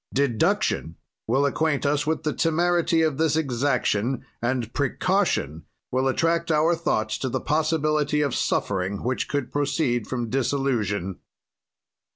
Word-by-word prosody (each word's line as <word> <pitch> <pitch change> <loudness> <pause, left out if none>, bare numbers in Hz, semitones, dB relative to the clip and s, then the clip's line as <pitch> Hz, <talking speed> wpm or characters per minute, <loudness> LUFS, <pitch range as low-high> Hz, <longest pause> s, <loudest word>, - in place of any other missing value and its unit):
"Deduction 120 - +1 0.3
will 135 +5 +2
acquaint 145 +1 0
us 145 +1 +1
with 160 0 0
the 155 - 0
temerity 170 0 +2
of 155 -3 0
this 160 -2 +2
exaction, 130 -4 0 0.2
and 120 -1 -1
precaution 140 - 0 0.3
will 130 +1 +1
attract 165 +5 +1
our 160 +2 +3
thoughts 110 -10 -1
to 130 - -2
the 130 +1 -1
possibility 155 -1 +1
of 140 -4 0
suffering 95 -3 -1
which 125 +1 -1
could 140 -3 -2
proceed 135 -5 0
from 120 -2 -3
disillusion. 115 -7 -1
140 Hz, 130 wpm, -24 LUFS, 120-155 Hz, 0.3 s, our